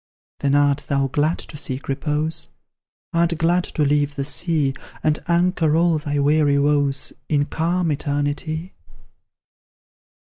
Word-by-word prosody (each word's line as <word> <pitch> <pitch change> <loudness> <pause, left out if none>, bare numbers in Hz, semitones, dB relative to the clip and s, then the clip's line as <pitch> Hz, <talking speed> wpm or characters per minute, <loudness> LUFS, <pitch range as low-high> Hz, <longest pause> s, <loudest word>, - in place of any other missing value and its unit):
"Then 140 0 +1
art 145 0 +2
thou 140 -1 +1
glad 150 +5 +1
to 150 - -9
seek 135 -2 -5
repose? 150 +3 -1 0.7
Art 170 0 +2
glad 175 +2 +2
to 150 - -1
leave 145 0 +1
the 140 -2 -2
sea, 150 -1 +1 0.3
And 155 0 +2
anchor 170 -3 +2
all 165 -1 +3
thy 145 -1 -2
weary 145 0 +3
woes 145 -1 +1 0.2
In 145 -2 +2
calm 170 +2 0
Eternity? 145 +4 -2
150 Hz, 130 wpm, -22 LUFS, 145-165 Hz, 0.7 s, all